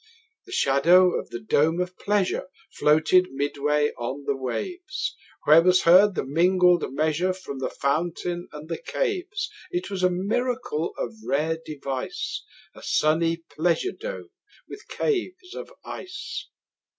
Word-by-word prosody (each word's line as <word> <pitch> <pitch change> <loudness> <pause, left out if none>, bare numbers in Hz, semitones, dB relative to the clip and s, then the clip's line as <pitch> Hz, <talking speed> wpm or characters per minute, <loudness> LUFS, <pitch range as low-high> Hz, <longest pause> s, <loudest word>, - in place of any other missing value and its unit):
30 440 - -28 0.4
The - - -12
shadow 175 - +5
of - - -9
the 120 - -5
dome 155 +9 +2
of 180 0 -2
pleasure 205 -2 0 0.2
Floated 155 +5 +3
midway 145 +1 +1
on 130 +4 -4
the 140 - 0
waves; 355 - -4 0.3
Where 155 +2 +8
was 180 +1 +4
heard 190 +4 +6
the - - -1
mingled 180 +4 +4
measure 155 +6 +1
From 160 -7 -8
the 130 - -2
fountain 175 +4 -2
and 150 +1 -9
the 165 -1 -4
caves. 410 -4 -2 0.2
It 355 - -3
was 190 -2 -3
a 185 - +4
miracle 210 -1 -1
of - - -3
rare 160 +3 0
device, 140 -4 -4 0.3
35 - - -14
A - - -15
sunny 165 +2 +2 0.2
pleasure 175 - +1
dome 435 -2 -7 0.4
with 415 - -11
caves 365 -2 -2
of - - -8
ice! 370 - -6
175 Hz, 145 wpm, -25 LUFS, 150-210 Hz, 0.4 s, Where